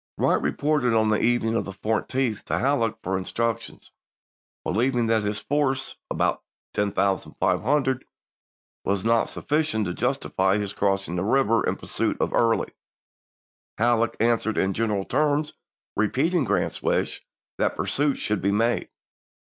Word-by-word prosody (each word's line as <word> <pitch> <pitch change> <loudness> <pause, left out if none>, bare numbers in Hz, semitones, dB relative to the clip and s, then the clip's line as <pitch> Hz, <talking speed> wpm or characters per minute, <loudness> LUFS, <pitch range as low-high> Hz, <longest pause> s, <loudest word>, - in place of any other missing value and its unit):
Wright - - +2
reported 145 -6 +1
on 110 -1 +3
the 105 - +2
evening 115 -1 +2
of 115 - +1
the 95 - -6
14th 110 +2 -1
to - - -1
Halleck 115 -5 +1
for 95 +1 -1
instructions, 115 +4 -3 0.7
believing 120 +3 +1
that 110 -1 +2
his 105 0 -2
force, 135 -1 -1
about - - 0 0.3
10,500, 110 +7 0 0.8
was 100 +1 -1
not 115 0 +3
sufficient 150 -8 0
to 90 - -2
justify 95 +2 0
his 100 -1 -3
cross 100 -1 0
ing 90 - -3
the 90 - 0
river 115 0 +3
in - - 0
pursuit - - -2
of - - 0
Early. 115 -1 +2 1.1
Halleck 115 0 +2
an 115 +1 +4
swered 110 -1 -3
in 95 0 +1
general 105 -3 -1
terms 150 0 +1 0.4
repeating 140 - +1
Grant's 105 -1 0
wish - - -1 0.4
that - - +1
pursuit 145 0 +1
should 105 -1 -1
be 100 - +1
made. 115 +4 +1
115 Hz, 140 wpm, -25 LUFS, 105-130 Hz, 1.1 s, an